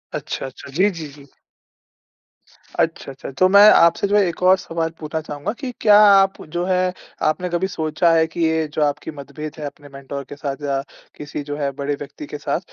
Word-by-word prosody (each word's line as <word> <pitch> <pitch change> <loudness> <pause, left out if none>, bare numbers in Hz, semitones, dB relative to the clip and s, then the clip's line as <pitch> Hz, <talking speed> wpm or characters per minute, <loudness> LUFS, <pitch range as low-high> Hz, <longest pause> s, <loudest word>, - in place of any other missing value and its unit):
अच्छा, - - -4
अच्छा। 135 +1 -10
जी, 190 +8 +3
जी, 165 -5 -7
जी। 140 -1 -15 1.2
अच्छा, - - -1
अच्छा, 160 -4 -10
अच्छा। 135 +1 -9
तो 185 - +6
मैं 200 +2 +8
आपसे 170 +4 +4
जो 205 - +1
है - - +5
एक 170 - -5
और 185 +1 +6
सवाल 165 -2 -3
पूछना 160 0 -4
चाहूँगा 150 +6 -5
कि 260 -3 -4
क्या 210 -1 +7
आप 195 -1 +5
जो 175 - 0
है 185 -1 +1 0.4
आपने 180 +4 -2
कभी 175 +2 0
सोचा 160 -1 +1
है 160 0 +4
कि 170 +1 -6
ये 160 -1 +1
जो 155 - -1
आपकी 150 +2 -2
मतभेद 150 +1 -8
है 150 - -5
अपने 145 0 -9
मेंटर 140 0 -7
के 145 - -7
साथ 140 0 -5
या 135 -1 0 0.3
किसी 150 0 -6
जो 145 - -3
है 140 -2 -1
बड़े 145 +1 -1
व्यक्ति 145 +1 -9
के 150 - -6
साथ। 155 - -2
160 Hz, 210 wpm, -21 LUFS, 145-180 Hz, 1.2 s, मैं